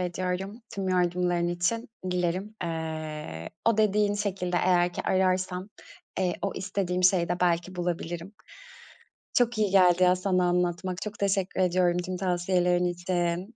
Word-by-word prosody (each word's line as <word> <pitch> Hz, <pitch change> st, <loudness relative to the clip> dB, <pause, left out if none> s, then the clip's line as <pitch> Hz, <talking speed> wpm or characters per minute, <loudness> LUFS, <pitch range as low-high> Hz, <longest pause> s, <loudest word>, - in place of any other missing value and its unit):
ediyorum, 185 Hz, +4 st, -3 dB
tüm 195 Hz, -1 st, -2 dB
yardımların 175 Hz, -1 st, +1 dB
için. 175 Hz, +8 st, -1 dB, 0.2 s
Dilerim, 180 Hz, +4 st, -1 dB
eee, 155 Hz, -, -5 dB
o 230 Hz, -2 st, +3 dB
dediğin 210 Hz, -1 st, +3 dB
şekilde 190 Hz, -3 st, -2 dB
eğer 175 Hz, -1 st, +3 dB
ki -, -, -4 dB
ararsam, 185 Hz, 0 st, 0 dB, 0.5 s
eee, 180 Hz, -2 st, +1 dB
o 200 Hz, -, -1 dB
istediğim 185 Hz, -1 st, -2 dB
şeyi 180 Hz, -2 st, +4 dB
de 175 Hz, -, -2 dB
belki 175 Hz, +1 st, +1 dB
bulabilirim. 175 Hz, +2 st, -4 dB, 1.0 s
Çok 240 Hz, -2 st, +2 dB
iyi 210 Hz, -3 st, +1 dB
geldi 185 Hz, -2 st, +5 dB
ya 180 Hz, 0 st, +5 dB
sana 185 Hz, -1 st, +1 dB
anlatmak. 180 Hz, +1 st, -1 dB
Çok 210 Hz, -1 st, -6 dB
teşekkür 195 Hz, -1 st, 0 dB
ediyorum 180 Hz, -1 st, +2 dB
tüm 180 Hz, +1 st, -3 dB
tavsiyelerin 180 Hz, -1 st, +1 dB
için. 175 Hz, +3 st, -2 dB
180 Hz, 135 wpm, -27 LUFS, 175-190 Hz, 1.0 s, geldi